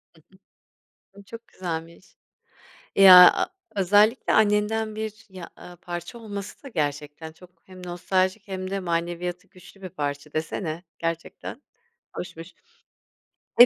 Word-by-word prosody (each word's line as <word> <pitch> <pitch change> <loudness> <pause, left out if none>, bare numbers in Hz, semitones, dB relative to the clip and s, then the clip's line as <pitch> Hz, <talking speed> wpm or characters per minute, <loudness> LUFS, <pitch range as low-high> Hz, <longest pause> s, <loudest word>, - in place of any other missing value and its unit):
Hı 160 - -21 0.7
hı. 195 - -36
Imm, 200 - -12
çok 230 +4 -12
güzelmiş. 170 0 -7 0.8
Ya, 185 -2 +10
a - - 0 0.3
özellikle 205 +5 +3
annenden 215 +1 +2
bir 220 0 -6
ya 185 -3 -10
a 180 - -12
parça 175 +5 -7
olması 205 +2 -8
da - - -9
gerçekten 150 - -3
çok 180 +2 -17 0.2
hem 185 -1 -13
nostaljik 185 +3 -1
hem 185 -1 -5
de 195 - -1
maneviyatı 175 0 -3
güçlü 190 +2 -17
bir 185 - -7
parça 145 -1 -5
desene 160 +1 -3 0.2
gerçekten 165 - -5 0.6
hoşmuş. 165 0 -8 1.1
E, 245 - +13
185 Hz, 125 wpm, -25 LUFS, 170-205 Hz, 1.1 s, E